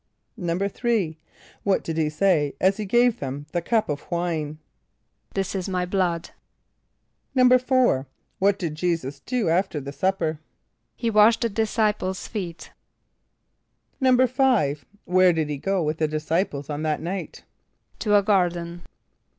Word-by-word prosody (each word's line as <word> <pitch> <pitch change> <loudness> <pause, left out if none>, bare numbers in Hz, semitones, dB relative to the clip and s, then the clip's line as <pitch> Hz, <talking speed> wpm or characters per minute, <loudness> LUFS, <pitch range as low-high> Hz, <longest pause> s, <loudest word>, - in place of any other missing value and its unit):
"= - - -23
=3.= 190 0 -1 0.4
What 195 -2 +1
did 165 - -4
he 160 -2 +1
say 155 -3 +1
as 190 +2 +3
he 215 - -3
gave 240 +3 +3
them 140 +1 -5
the 175 - -1
cup 220 +5 +1
of 145 -1 -5
wine? 165 -4 -2 0.8
="This 195 -1 -1
is 190 -1 -3
my 180 -1 -1
blood."= 180 -2 -1 1.1
=4.= 255 - +4 0.3
What 200 +1 +3
did 170 -6 -3
J[=e]´[s+]us 155 -4 -2
do 240 - -2
after 175 -1 +1
the 140 0 -7
supper? 160 0 -1 0.6
=He 230 -2 -1
washed 215 +2 +5
the 235 - +1
disciples' 210 -3 -1
feet.= 180 -7 -6 1.3
=5.= 255 - +3 0.2
Where 185 0 +4
did 160 -2 -1
he 145 - -2
go 195 +4 0
with 155 +1 -2
the 155 - +2
disciples 155 -1 -1
on 150 0 -4
that 155 -1 0
night? 180 +4 -5 0.6
=To 210 -2 +2
a 200 - +5
garden. 175 -4 0
180 Hz, 140 wpm, -24 LUFS, 155-210 Hz, 1.3 s, washed